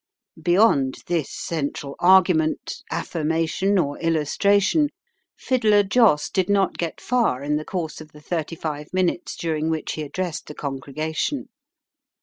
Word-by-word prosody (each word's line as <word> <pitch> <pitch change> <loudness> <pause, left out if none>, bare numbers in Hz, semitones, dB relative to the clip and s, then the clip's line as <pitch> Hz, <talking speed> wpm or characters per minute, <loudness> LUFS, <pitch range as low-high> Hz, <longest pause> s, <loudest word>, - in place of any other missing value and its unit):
Beyond 175 -7 +3
this 165 -5 -1
central 145 -3 -4
argument, 175 -4 +3
affirmation, 165 +4 0
or 145 -5 0
illustration, 200 - +2 0.5
Fiddler 215 -5 +3
Joss 195 -7 +3
did 190 -1 0
not 200 -1 +1
get 170 -2 -3
far 235 - 0
in 150 +1 0
the 155 - -5
course 165 -4 -4
of 155 -1 -12
the 150 - -14
thirty 165 +1 -3
five 150 -2 -5
minutes 185 -1 0
during 160 -1 -1
which 160 -1 -2
he 155 - -4
addressed 170 +3 -4
the 150 - -8
congregation. 155 - -3
165 Hz, 130 wpm, -23 LUFS, 150-190 Hz, 0.5 s, Beyond